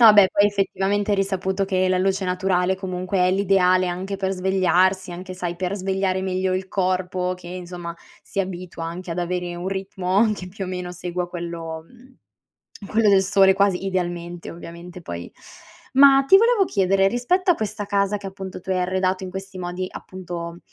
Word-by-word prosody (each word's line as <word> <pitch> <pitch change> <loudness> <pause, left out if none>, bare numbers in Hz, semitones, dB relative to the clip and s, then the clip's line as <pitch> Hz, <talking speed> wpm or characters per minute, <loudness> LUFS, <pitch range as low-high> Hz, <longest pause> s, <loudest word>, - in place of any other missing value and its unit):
No, 225 -2 +10
beh, 205 -2 +7
poi, 205 - +5
effettivamente, 205 0 0
è - - +4
risaputo 195 0 0
che 185 -1 +1
la 185 0 +2
luce 195 +1 +1
naturale, 180 0 +1
comunque, 185 0 -3
è 180 0 +4
l'ideale 185 -1 +3
anche 185 +3 -3
per 190 -1 -1
svegliarsi, 190 0 +2
anche, 185 +1 -7
sai, 175 -2 -3
per 185 +2 -2
svegliare 190 -1 -1
meglio 185 0 0
il 185 0 -2
corpo 185 -1 -1
che, 180 -1 -12
insomma, 175 -1 -6 0.3
si 195 - -3
abitua 180 -3 -5
anche 175 +2 -6
ad 170 - -3
avere 175 0 -2
un 175 +2 -4
ritmo 195 +2 +1
che, 185 -3 -6
più 195 +1 -6
o - - -6
meno, 180 -1 -4
segua 180 0 -4
quello 165 -2 -6
mhmm, 250 +3 -20 0.7
quello 220 0 +3
del 195 -1 +6
sole, 190 0 +5
quasi 195 -1 +1
idealmente, 175 -2 -3
ovviamente, 170 +1 -10
poi 85 - -7 0.6
Ma 275 0 +7
ti 385 - +9
volevo 460 -1 +4
chiedere: 195 - +2
rispetto 250 - +1
a 350 - +6
questa 215 -3 -4
casa 200 0 +1
che, 200 -1 -7
appunto, 190 -1 -7
tu 190 - -11
hai 185 -1 +1
arredato 185 +1 0
in 185 - -6
questi 195 0 -7
modi, 180 +1 -4
appunto 175 -2 -7
185 Hz, 180 wpm, -23 LUFS, 180-195 Hz, 0.7 s, No